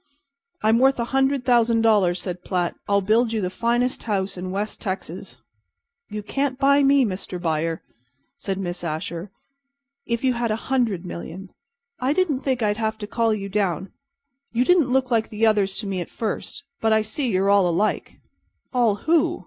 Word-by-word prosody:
"I'm 220 +2 +4
worth 265 0 +4
a 235 - 0
hundred 270 -1 +2
thousand 235 -2 +3
dollars," 200 -5 +3
said 180 -2 -5
Platt. 180 -2 -1 0.2
"I'll 200 0 +3
build 220 +4 +2
you 220 - 0
the 185 -3 -2
finest 240 +4 0
house 200 -3 -2
in 185 0 -5
West 205 +3 -3
Texas." 190 -2 -5 0.7
"You 210 0 -5
can't 275 +4 -1
buy 280 +1 +4
me, 275 -1 +5
Mr. 185 -2 -4
Buyer," 165 -1 -1 0.5
said 195 -8 -4
Miss 175 -2 -4
Asher, 165 +3 -4 0.8
"if 235 +1 -1
you 260 -1 +3
had 235 -1 -1
a 215 - +1 0.2
hundred 220 -9 +1
million. 180 +2 -7 0.5
I 260 +3 +1
didn't 320 -6 +1
think 260 -4 -1
I'd 210 0 +1
have 220 -1 -1
to 215 - -6
call 225 +2 +1
you 200 -2 -2
down. 190 -3 -1 0.6
You 240 +2 +1
didn't 345 -6 +4
look 260 -1 +1
like 225 -2 +1
the 220 +1 +1
others 205 -3 +2
to - - -7
me 190 -2 -2
at 175 - -6
first, 235 +5 -4 0.2
but 225 - +2
I 220 0 +4
see 255 +6 -2
you're 195 -1 +2
all 200 -3 +4
alike." 205 +6 -1 0.5
"All 235 -5 +3
who?" 330 0 +2
215 Hz, 180 wpm, -23 LUFS, 190-245 Hz, 0.8 s, me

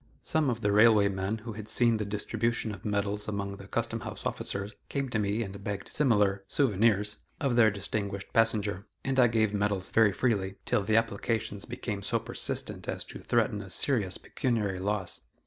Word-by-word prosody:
Some 155 -3 +1
of 120 -2 -2
the 105 - +2
railway 105 -1 +6
men 95 +2 -2
who 115 - -4
had 110 0 -8
seen 115 0 +4
the 105 - -2
distribution 110 +2 -1
of 100 -2 -9
medals 105 0 -1
among 100 -1 -3
the 100 - -11
Custom 115 +1 -1
house 110 -1 -7
officers 100 +1 -3
came 140 -2 -2
to 110 - 0
me 105 +2 0
and 100 -1 -8
begged 100 -1 -4
similar 105 -8 +2
"souvenirs" 105 -4 +2 0.2
of 135 -5 +1
their 115 -2 +6
distinguished 100 -1 -3
passenger, 105 -3 +1 0.2
and 135 -1 +1
I 125 - +7
gave 110 -2 +2
the 105 - -1
medals 100 -2 0
very 110 -2 +5
freely, 100 -3 0
till - - +2
the 110 +2 +2
applications 115 -2 -1
became 115 -4 -4
so - - 0
persistent - - -3
as - - -2
to - - -9
threaten - - +1
a - - -9
serious 105 -9 +1
pecuniary 105 -7 -1
loss. 100 -1 -2
105 Hz, 185 wpm, -29 LUFS, 100-115 Hz, 0.2 s, I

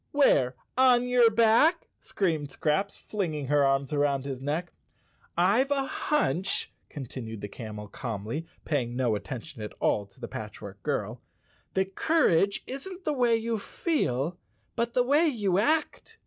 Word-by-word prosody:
"Where? 135 - +4 0.2
On 250 -1 +5
your 245 -2 +5
back?" 230 +10 +4
screamed 160 -7 -1
Scraps, 160 +9 -1
fling¬ 190 -7 -3
ing 145 -2 -3
her 145 -1 +4
arms 135 0 +1
about 145 -2 +1
his 135 -2 -5
neck. 155 +5 -2 0.7
"Tve 205 +10 +3
a 280 -1 +1
hunch," 195 - 0 0.2
continued 115 -6 -7
the 105 - -4
camel 105 -1 -8
calmly, 115 +8 -5 0.2
paying 125 -6 -1
no 125 -3 +1
attention 125 +4 -6
at 105 - -6
all 100 -1 +1
to 100 - -24
the 120 - -5
Patchwork 105 -2 -8
Girl, - - -2 0.5
"that 190 0 0
courage 200 - +2
isn't 360 +8 -7
the 305 - 0
way 245 -4 +3
you 225 0 -1
feel, 175 - -1 0.4
but 235 0 -1
the 250 - +4
way 290 +6 +4
you 205 - +1
act. 305 +8 0
170 Hz, 150 wpm, -28 LUFS, -, 0.7 s, On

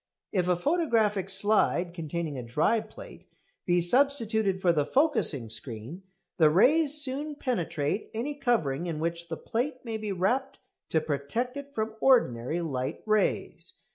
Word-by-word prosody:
If 180 -3 0
a 180 - +3
photographic 220 - +1
slide 195 -3 +3
containing 165 -2 -4
a 130 - -4
dry 150 - +1
plate - - -13 0.4
be 175 0 +3
substituted 220 -2 +2
for 180 -2 +3
the 150 -3 +2
focusing 255 - +2
screen, 115 - -6 0.4
the 160 -4 +5
rays 285 - +4
soon 295 +1 0
penetrate 170 - -2
any 245 +7 -3
covering 180 - 0
in 160 -3 -3
which 170 +1 -3
the 165 -1 -5
plate 255 +3 -3
may 225 -1 -3
be 215 -1 -4
wrapped 245 +9 -1 0.3
to 160 - +1
protect 155 - -3
it 280 0 -9
from 220 0 -2
ordinary 160 - +2
light 130 -6 -4
rays. 215 -1 0
195 Hz, 145 wpm, -28 LUFS, 160-250 Hz, 0.4 s, the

